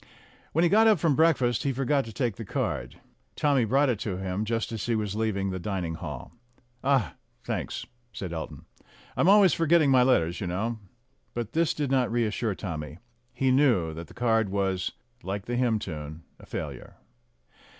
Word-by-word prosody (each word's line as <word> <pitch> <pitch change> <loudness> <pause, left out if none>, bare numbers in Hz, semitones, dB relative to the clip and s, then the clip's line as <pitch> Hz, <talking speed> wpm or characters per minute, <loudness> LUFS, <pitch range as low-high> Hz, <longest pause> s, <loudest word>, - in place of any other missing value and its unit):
When 165 - +2
he 175 - +4
got 220 +2 +6
up 215 -3 +6
from 155 -3 +2
breakfast 130 -7 +3
he 140 - 0
forgot 135 +1 +1
to 115 - -8
take 115 -1 -1
the 115 - -5
card. - - -3 0.4
Tommy 140 -5 +2
brought 135 +6 +3
it 120 -6 0
to 100 -4 -3
him 95 +2 -2
just 115 +1 -1
as 110 -2 -4
he 120 - +1
was 105 -2 -2
leaving 100 -3 -1
the 95 - -3
dining 90 -3 -3
hall. 75 -6 -7 0.5
"Ah, 135 -4 +2 0.3
thanks!" - - -3 0.3
said 95 -4 -6
Elton. 80 - -6 0.5
"I'm 175 - +3
always 200 -3 +7
forgetting 165 -3 +4
my 130 -1 +6
letters, 85 -10 +2
you 95 - -2
know." 110 +6 -2 0.6
But 120 -2 -3
this 165 +1 +1
did 145 -3 -2
not 130 -4 +2
reassure 115 -2 0
Tommy; 80 -5 -5 0.3
he 130 +2 +1
knew 120 - +3
that 85 +2 -7
the - - -16
card 115 -3 +2
was, 95 -2 -1 0.3
like 100 -1 -4
the 120 - -2
hymn 120 -3 +2
tune, 80 -4 -7 0.2
a - - -15
failure. - - -6
115 Hz, 180 wpm, -27 LUFS, 95-135 Hz, 0.6 s, always